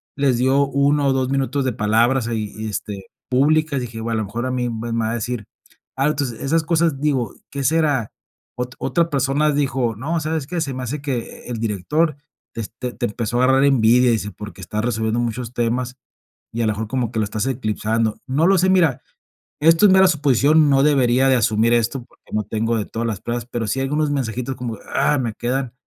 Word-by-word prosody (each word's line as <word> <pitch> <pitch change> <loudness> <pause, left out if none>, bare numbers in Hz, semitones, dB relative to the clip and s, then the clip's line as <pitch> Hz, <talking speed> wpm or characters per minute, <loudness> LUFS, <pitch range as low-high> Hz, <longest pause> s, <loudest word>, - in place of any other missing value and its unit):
les 135 -3 +2
dio 135 +3 +3
1 140 +1 +2
o 135 - +3
2 130 -1 0
minutos 135 0 0
de 130 - 0
palabras 115 +4 +2
ahí 110 -3 -3
y, 110 0 -4
este, 100 -2 -5 0.2
públicas. 145 +2 +2
Dije, 120 -2 -7
a 115 +1 -3
lo 110 -1 -1
mejor 115 +5 -4
a 130 - -2
mí 125 -1 -1
me 115 0 -4
me 115 - 0
va 110 - -1
a - - -1
decir, 120 -1 -3 0.5
al 135 +3 +2
entonces, 135 -6 -3
esas 160 +4 +1
cosas, 160 -3 +1
digo, 135 -6 0 0.2
¿qué 140 0 -4
será? 145 -5 +1 0.5
O 125 0 -2
otra 170 -1 +1
personas 140 +1 +1
dijo: 130 -5 0
"No, 155 +10 -2
¿sabes 155 -1 -2
qué? 175 +2 -3
Se 140 -4 -2
me 130 0 -5
hace 140 +4 -4
que 130 -5 -5
el 120 -1 -4
director 135 - 0 0.4
te 115 - -4
este 120 +4 -6
te - - -2
empezó 115 +2 -2
a - - +3
agarrar 135 +1 +4
envidia", 125 -2 +4
dice: 105 -2 -1
"Porque 105 -2 -10
estás 105 +3 -3
resolviendo 110 -1 0
muchos 120 0 -3
temas 125 +1 -1 0.6
y 115 - -2
a - - +1
lo 110 - +2
mejor 110 +1 -4
como 125 -1 -1
que 115 - -3
lo - - +2
estás 105 +1 -2
eclipsando". 110 -3 -1
No 145 +6 +2
lo 195 0 +4
sé, 185 +2 +3
mira 165 -9 +3 0.6
esto 165 +5 +5
es - - +4
mera 190 0 +6
suposición. 150 -1 +3
No 135 -1 +4
debería 135 -3 +3
de 130 - +5
asumir 115 0 +2
esto 120 +2 0
porque - - -26
no 105 - 0
tengo 115 +2 -1
de 105 - -2
todas 115 +1 -3
las 105 -4 -4
pruebas, 120 -1 -3
pero 115 -2 -3
sí 130 - -1
hay 135 - 0
unos 150 0 0
mensajitos 125 -1 -2
como 125 -3 -5
de - - -18
ah, 145 +2 +3
me 120 -4 -2
quedan 125 +2 -2
125 Hz, 220 wpm, -21 LUFS, 115-140 Hz, 0.6 s, mera